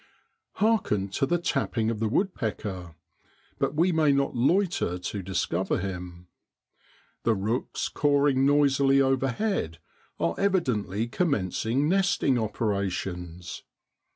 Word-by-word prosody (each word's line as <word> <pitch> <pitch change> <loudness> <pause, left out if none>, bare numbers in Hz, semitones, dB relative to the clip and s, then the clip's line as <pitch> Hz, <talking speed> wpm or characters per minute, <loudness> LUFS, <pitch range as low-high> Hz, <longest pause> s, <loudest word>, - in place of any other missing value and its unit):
Hearken 190 - +1
to 135 +8 0
the 175 - +2
tapping 130 -8 -1
of 110 - -4
the 110 - +1
woodpecker; 105 - -2 0.6
but - - 0
we 170 +4 +3
may 155 -3 +3
not 140 -1 +1
loiter 165 - +1
to 95 +3 -4
discover 95 0 -1
him. 90 -2 -6 1.0
The 115 - +2
rooks 110 +6 -2
cawing 145 -2 +2
noisily 140 -1 +4
overhead 135 - 0 0.4
are 85 0 +1
evidently 120 - 0
commencing 120 - 0
nesting 185 -8 +2
operations. 95 -5 -3
120 Hz, 105 wpm, -27 LUFS, 95-145 Hz, 1.0 s, noisily